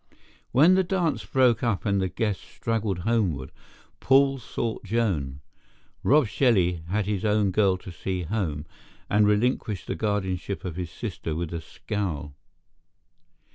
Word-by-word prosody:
When 155 +9 +6
the 190 0 +4
dance 175 -3 0
broke 130 -3 +3
up 115 -6 0
and 100 -2 +2
the 95 - 0
guests 105 -1 -2
straggled 110 -4 -2
homeward, 95 - 0 0.5
Paul 135 0 +4
sought 115 -1 -4
Joan. 90 - -1 0.6
Rob 145 +1 +4
Shelley 100 -7 +2
had 100 +3 0
his 100 -2 -2
own 105 -2 +2
girl 95 -1 +3
to 95 - -10
see 90 +2 -3
home 80 -6 -2 0.5
and 105 0 +4
relinquished 105 -1 +1
the - - -2
guardianship 100 -3 -2
of 90 -4 -4
his 90 -2 -4
sister 80 +2 -5
with 85 0 -3
a 85 - -3
scowl. 80 -5 -4
105 Hz, 140 wpm, -26 LUFS, 90-115 Hz, 0.6 s, When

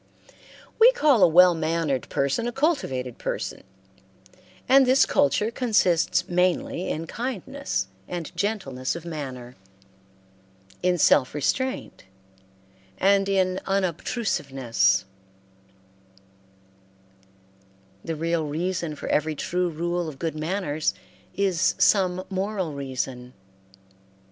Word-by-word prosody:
We 470 +3 +8
call 295 - +3
a - - +8
well 180 +2 +6
mannered 160 -4 -1
person 140 - 0
a - - -2
cultivated 185 - -1
person; - - -4 1.1
and 265 0 +6
this 260 +2 +5
culture 255 -6 +1
consists 185 -7 +1
mainly 180 0 0
in 160 +2 -3
kindness 255 - -4 0.2
and 170 -3 -6
gentleness 170 -11 -2
of 170 0 -8
manner, 130 -7 -7 1.3
in 180 0 +2
self 145 -4 +3
restraint, 260 - -2 0.9
and 195 0 +3
in 190 -1 +1
unobtrusiveness 135 - 0 3.0
The 165 - -3
real 165 0 -1
reason 170 +1 -2
for - - -7
every 155 +1 +1
true 180 +4 -1
rule 170 +1 -2
of 145 - -10
good 165 +2 -3
manners 155 -1 -2 0.4
is 190 -3 +1
some 185 -1 +3
moral 190 -4 -3
reason. 130 -2 -5
175 Hz, 100 wpm, -25 LUFS, 150-195 Hz, 3.0 s, We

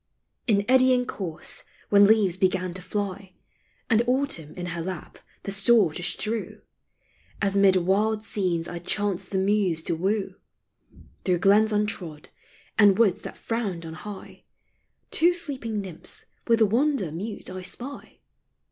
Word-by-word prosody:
* - - -52
In 205 -3 +3
eddying 255 -1 +4
course 175 -9 -4 0.3
when 200 0 +7
leaves 210 -5 +4
began 185 -1 0
to 185 - -5
fly, 195 0 -4 0.5
And 230 -1 +4
Autumn 250 - -1
in 180 - -5
her 170 - -4
lap 180 -1 -6 0.2
the 200 - -4
store 200 -3 +4
to 180 - -2
strew, 215 +4 -2 0.8
As 200 -1 +1
mid 195 -1 +5
wild 205 +4 +1
scenes 180 -6 -1
I 175 - -5
chanced 195 0 -1
the 195 - -2
Muse 190 -4 +1
to - - 0
woo, 195 +4 -1 0.9
Through 180 -2 +2
glens 205 +4 +4
untrod, 200 -8 -2 0.5
and 205 -3 +6
woods 210 -4 +3
that - - -8
frowned 200 -8 -3
on 160 - -7
high, 200 +5 -10 0.7
Two 345 +2 +4
sleeping 260 -11 -4
nymphs 180 -4 -6 0.2
with 230 -1 +4
wonder 235 - +1
mute 200 +5 -6
I 185 0 -6
spy 245 +9 -8
200 Hz, 145 wpm, -25 LUFS, 180-220 Hz, 0.9 s, when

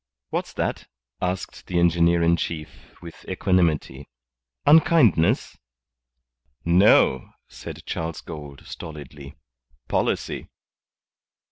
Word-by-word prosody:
"What's - - -3
that?" - - -3 0.3
asked 90 +1 -4
the 90 - -2
engineer 85 0 +3
in 85 +1 +4
chief, 80 -2 -7
with 85 -1 -11
equanimity. 85 -7 0 0.6
"Unkindness?" 145 - +4 1.1
"No," 85 -6 +4 0.2
said - - -10
Charles 80 0 -4
Gould, 75 -4 -10
stolidly. 75 -3 -10 0.5
"Policy." - - -2
85 Hz, 85 wpm, -24 LUFS, 75-90 Hz, 1.1 s, in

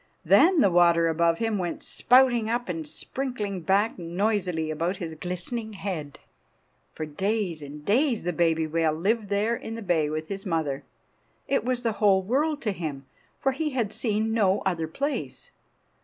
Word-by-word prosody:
Then 350 -2 +6
the 195 - +4
water 170 -1 +5
above 165 +1 +2
him 225 -1 -1
went 175 -2 -3
spouting 245 -3 +3
up, 240 +1 -1
and 165 -4 -4
sprinkling 210 - -4
back 195 +5 +1
noisily 180 -2 -1
about 170 +5 -1
his 165 -3 -5
glistening 180 +7 -3
head. 180 -8 -5 0.7
For 155 - -5
days 190 +1 -2
and 150 +1 -9
days 245 +2 +2
the 175 +1 -1
baby 165 -1 +2
whale 160 0 +1
lived 205 +6 0
there 210 +3 +1
in 225 -1 -6
the 230 - -6
bay 165 -5 +1
with 155 +1 -4
his 195 +1 -5
mother. 155 -6 -2 0.6
It 275 - +1
was 250 0 -1
the 230 - +1
whole 195 -2 +4
world 290 +8 0
to 210 - 0
him, 150 -7 -5 0.3
for 270 - +1
he 305 +3 -2
had 215 -4 0
seen 220 -1 0
no 205 -3 +2
other 170 -4 -1
place. 280 - -4
190 Hz, 170 wpm, -26 LUFS, 165-225 Hz, 0.7 s, Then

